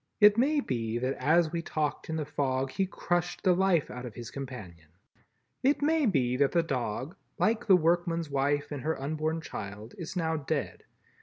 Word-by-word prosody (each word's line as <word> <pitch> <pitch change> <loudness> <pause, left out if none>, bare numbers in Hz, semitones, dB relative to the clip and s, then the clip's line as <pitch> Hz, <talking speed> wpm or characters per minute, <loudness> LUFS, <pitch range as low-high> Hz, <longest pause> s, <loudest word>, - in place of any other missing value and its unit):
It 210 0 +8
may 285 +5 +3
be 115 - -2
that 130 +2 0
as 160 +4 +3
we 170 -1 -2
talked 155 -2 -2
in 160 - -1
the 155 -2 -2
fog 135 -2 -1
he 195 +4 0
crushed 175 -2 -2
the 185 -2 +5
life 180 -4 +2
out 125 0 -7
of 120 -4 -7
his 120 -2 -7
companion. 105 - -8 0.7
It 285 +2 +2
may 310 -2 +3
be 130 - +2
that 140 0 +2
the 170 -1 +3
dog, 130 - -3 0.2
like 220 0 +1
the 195 - +8
workman's 170 0 +1
wife 145 +1 0
and 145 -2 -4
her 160 +4 -1
unborn 155 +3 -2
child, 105 -5 -7
is 170 +1 -6
now 160 -2 0
dead. 140 - -3
155 Hz, 185 wpm, -29 LUFS, 130-175 Hz, 0.7 s, It